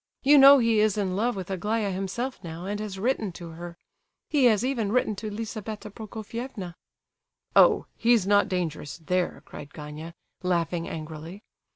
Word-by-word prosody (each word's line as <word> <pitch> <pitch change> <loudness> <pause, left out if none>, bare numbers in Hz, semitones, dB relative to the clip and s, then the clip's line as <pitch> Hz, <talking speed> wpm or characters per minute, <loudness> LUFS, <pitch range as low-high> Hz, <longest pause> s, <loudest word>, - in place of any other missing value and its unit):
You 285 +1 +7
know 275 +1 +10
he 230 -3 +3
is 215 0 +2
in 190 -3 -1
love 235 +4 0
with 190 -1 -6
Aglaya 205 +2 -1
himself, 195 +6 -4
now, 165 +1 -7
and 205 +1 -3
has 210 -2 -5
written 220 -1 0
to 170 0 -9
her; 170 +1 -9 0.5
he 285 -4 +3
has 225 -1 +4
even 235 -6 -1
written 225 -3 +1
to 215 +1 -5
Lizabetha 215 0 -6
Prokofievna!" 220 -2 -7 0.8
"Oh! - - +6
he's 230 -4 +3
not 205 +1 +3
dangerous 170 -6 -3
there!" 180 +2 -2
cried 145 - -11
Gania, 155 +2 -8 0.3
laughing 170 -2 -1
angrily. 160 +5 -8
200 Hz, 160 wpm, -26 LUFS, 175-225 Hz, 0.8 s, know